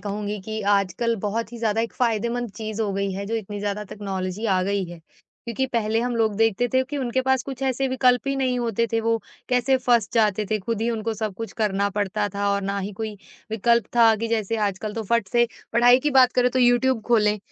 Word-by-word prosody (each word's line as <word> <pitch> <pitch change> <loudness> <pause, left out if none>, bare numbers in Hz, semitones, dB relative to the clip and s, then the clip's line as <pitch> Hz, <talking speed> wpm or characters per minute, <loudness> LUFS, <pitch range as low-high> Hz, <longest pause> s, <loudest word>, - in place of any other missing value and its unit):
कहूँगी 205 0 -4
कि 220 +3 -5
आजकल 200 +4 0
बहुत 230 +3 -3
ही 235 - -7
ज़्यादा 225 -1 0
एक 230 - -3
फ़ायदेमंद 235 0 -1
चीज़ 220 0 -3
हो 205 -2 -1
गई 200 0 -1
है, 200 +1 -5
जो 225 - -3
इतनी 210 -2 -4
ज़्यादा 205 +1 -3
टेक्नोलॉज़ी 195 0 -4
आ 190 -3 +2
गई 200 +1 0
है 175 -1 -10 0.5
क्योंकि 235 +3 -1
पहले 225 -1 +1
हम 245 0 -1
लोग 220 -2 +1
देखते 225 +2 +2
थे 260 0 +4
कि 290 +3 -6
उनके 260 -1 0
पास 265 -1 +2
कुछ 270 -2 -6
ऐसे 265 0 0
विकल्प 250 -1 +3
ही 275 - 0
नहीं 255 -2 0
होते 230 -1 0
थे, 225 - +2
वो 225 0 0 0.3
कैसे 250 +1 +3
फँस 240 -4 +2
जाते 215 -2 +2
थे, 215 - +1
खुद 220 +2 -3
ही 230 - 0
उनको 225 0 -2
सब 215 -2 -3
कुछ 225 +3 -6
करना 200 -1 +1
पड़ता 205 +1 -1
था 200 +1 -2
और 200 - -1
ना 200 +1 -2
ही 200 +1 -4
कोई 215 +1 -5 0.3
विकल्प 235 +2 +2
था 230 -1 +6
कि 230 +2 -3
जैसे 225 -1 -1
आजकल 200 +1 -3
तो 225 - -3
फट 235 -4 +2
से 240 0 +4 0.3
पढ़ाई 245 +1 +6
की 295 - 0
बात 260 -2 +5
करें 250 0 +3
तो 255 - -1
यूट्यूब 245 0 +3
खोलें, 210 -3 +3
225 Hz, 230 wpm, -23 LUFS, 205-240 Hz, 0.5 s, था